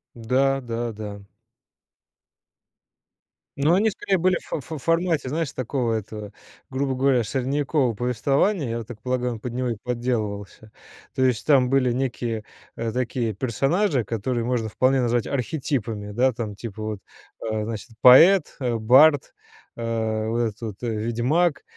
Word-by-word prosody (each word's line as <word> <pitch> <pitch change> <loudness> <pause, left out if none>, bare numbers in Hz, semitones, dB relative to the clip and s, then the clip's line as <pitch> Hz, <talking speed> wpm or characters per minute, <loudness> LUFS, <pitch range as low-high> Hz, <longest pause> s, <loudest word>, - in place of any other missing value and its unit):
Да, 130 +4 +1
да, 120 -1 -3
да. 105 -1 -7 2.4
Ну, 150 +4 +4
они 205 +4 +3
скорее 195 -2 -1
были 185 +1 +3
в - - -11
ф 150 +2 -10
ф 150 - -7
формате, 165 -5 +1
знаешь, 160 +1 -2
такого 125 -2 -2
этого, 105 -1 -5 0.4
грубо 135 0 -1
говоря, 130 -2 +2
средневекового 135 +1 0
повествования. 135 - +1
Я 115 - -4
так 110 -1 -11
полагаю, 125 0 -1
он 115 - -8
под 120 +2 -6
него 125 0 -1
и 115 - -1
подделывался. 110 -4 -3 0.4
То 130 - +2
есть 120 -5 +1
там 135 -4 +5
были 130 -2 +3
некие, 120 -3 -2 0.3
э, 115 -1 -3
такие 120 -2 -1
персонажи, 135 - 0
которые 115 +3 -2
можно 120 -3 -1
вполне 130 +4 +2
назвать 120 -1 +1
архетипами. 120 -6 -3
Да, 125 +5 +2
там, 110 -3 -5
типа, 110 0 -7
вот, 110 -2 -4 0.5
э, 110 -1 -1
значит, 110 +2 -6
поэт, 160 +8 +7
бард, 130 +4 +4 0.5
э, 110 -1 -1
вот 115 +1 -1
этот 115 -1 -2
вот 110 -4 -5
ведьмак, 120 +8 0
125 Hz, 145 wpm, -24 LUFS, 110-135 Hz, 2.4 s, поэт